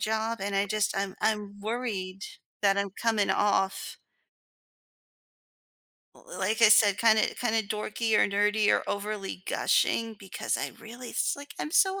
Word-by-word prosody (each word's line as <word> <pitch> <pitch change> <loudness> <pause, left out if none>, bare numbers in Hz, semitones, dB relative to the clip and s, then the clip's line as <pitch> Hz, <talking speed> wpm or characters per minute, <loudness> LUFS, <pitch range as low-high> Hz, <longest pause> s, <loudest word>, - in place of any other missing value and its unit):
job, 220 +1 -1
and 200 0 -3
I 200 - +2
just 215 0 -1
I'm 195 -1 -2
I'm 205 -2 -1
worried 205 -4 -4 0.4
that 200 0 +3
I'm 200 0 0
coming 225 -3 +1
off 195 -2 0 2.2
l - - -20
l - - -9
like 220 +2 0
I 215 - +8
said, 205 -2 +6
kinda 220 -1 +3
kinda 225 -2 0
dorky 215 +2 -2
or - - +4
nerdy 205 +1 +1
or - - +2
overly 200 -2 -4
gushing 230 - +1
because 195 -2 -3
I - - -3
really 235 +2 -9
it's - - 0
like, 285 0 -10
I'm 300 - -4
so 385 +3 +3
215 Hz, 155 wpm, -28 LUFS, 200-225 Hz, 2.2 s, I